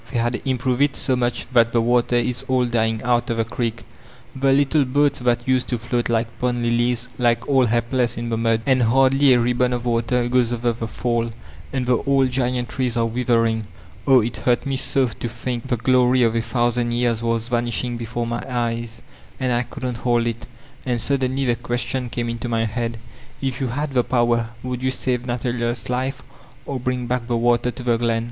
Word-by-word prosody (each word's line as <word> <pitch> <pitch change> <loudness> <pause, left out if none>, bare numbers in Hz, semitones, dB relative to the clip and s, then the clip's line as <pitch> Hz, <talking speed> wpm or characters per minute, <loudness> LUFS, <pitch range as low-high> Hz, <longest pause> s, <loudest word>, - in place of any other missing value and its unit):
they 130 - -2
had 120 +1 0
improved 130 0 0
it 145 0 +3
so 130 - 0
mudi 120 -1 -1
that 115 -2 +4
the 120 - +4
water 120 +1 +2
is 120 +1 0
all 130 -2 +2
dying 110 -2 0
out 120 +1 +1
of 115 - -1
the 115 - +1
creek; 115 0 -3 0.5
the 135 0 +2
little 140 +2 +3
boats 145 +2 +1
that 120 0 0
used 130 -1 +2
to 125 - -1
float 120 +1 -2
like 115 0 +1
pond 125 -1 0
lilies 120 +1 +1
lie 120 -1 +4
all 135 -3 +4
he^ 115 +1 +2
less 125 -3 +1
in 115 0 -3
the 115 - 0
mud, 115 0 +1
and 130 -2 +3
hardly 135 +4 +4
a 125 - +5
ribbon 125 +1 +1
of 120 -1 -2
water 120 +1 +1
goes 120 -1 +2
over 120 0 0
the 115 0 -5
fall, 115 0 -1 0.4
and 130 -2 -1
the 125 -1 +3
old 135 -1 +2
giant 125 -1 0
trees 125 -2 -2
are 115 - +2
withering. 115 -2 +1 0.4
Oh, 130 -2 +7
it 115 +2 -3
hurt 120 +3 +1
me 135 -1 -1
so 135 0 +1
to 115 0 -5
think 120 +1 -4
the 125 - 0
glory 125 +1 +3
of 115 -1 +3
a 115 - +2
thousand 120 0 0
years 120 -1 +1
was 115 0 -1
vanishing 120 0 -1
before 120 +1 -3
my 120 0 -3
eyes 115 -2 -2 0.4
and 130 -1 0
I 120 - +2
couldn't 125 -1 -5
hold 120 0 +1
it 115 0 -4 0.4
And 125 -2 -1
suddenly 135 +1 0
the 120 -2 +2
question 120 +1 -3
came 120 0 -3
into 115 +1 -4
my 115 -1 +1
head: 115 +1 -3 0.4
'If 135 -1 -3
you 130 - 0
had 140 +4 -3
the 125 -2 +3
power 120 -2 +1
would 125 -1 -4
you 130 - +1
save 125 -1 -1
Nathaniers 120 -1 -2
life 130 +2 -2 0.4
or 135 0 -3
bring 125 0 -2
back 120 -1 -2
the 120 -1 0
water 120 +1 +2
to 125 - -7
the 120 -1 +2
glen? 115 -1 +1
120 Hz, 210 wpm, -22 LUFS, 115-125 Hz, 0.5 s, Oh